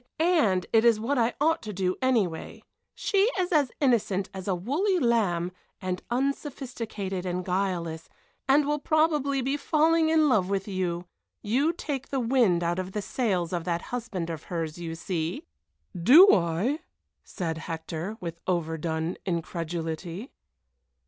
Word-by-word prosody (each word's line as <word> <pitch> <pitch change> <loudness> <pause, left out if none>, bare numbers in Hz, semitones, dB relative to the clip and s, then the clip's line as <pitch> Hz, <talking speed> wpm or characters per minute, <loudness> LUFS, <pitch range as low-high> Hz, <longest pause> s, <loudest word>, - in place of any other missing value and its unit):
And 310 - +3
it 225 0 +5
is 230 -2 +5
what 255 +5 0
I 230 +1 +1
ought 320 +3 +2
to 215 - -6
do, 185 -1 -1
anyway. 220 -11 0 0.3
She 400 +2 +2
is 365 -1 0
as 290 -6 +3
innocent 210 -8 +1
as 190 0 -7
a 190 - +1
woolly 305 - 0
lamb, 200 - +1 0.3
and 185 -1 -3
unsophisticated 240 - -3
and 180 0 -3
guileless, 180 -4 -2 0.4
and 285 +2 +5
will 295 +1 0
probably 295 -3 +2
be 275 +3 0
falling 315 +2 +3
in 315 -1 +4
love 205 -9 +2
with 195 0 -1
you. 180 -3 -2 0.4
You 260 +10 +2
take 290 -6 -5
the 270 - -1
wind 230 -8 +3
out 170 +2 0
of 185 +1 -5
the 210 - -2
sails 190 -5 -1
of 175 -2 -1
that 170 -1 -1
husband 205 -9 -3
of 160 -1 -7
hers, 165 -2 -4
you 165 -1 -5
see!" 170 -1 -3 0.5
"Do 285 - +8
I?" 185 - +1 0.4
said 165 -3 -4
Hector, 165 +5 -5
with 170 -3 -6
overdone 160 -1 -1
incredulity. 170 - -4
195 Hz, 150 wpm, -27 LUFS, 175-270 Hz, 0.5 s, Do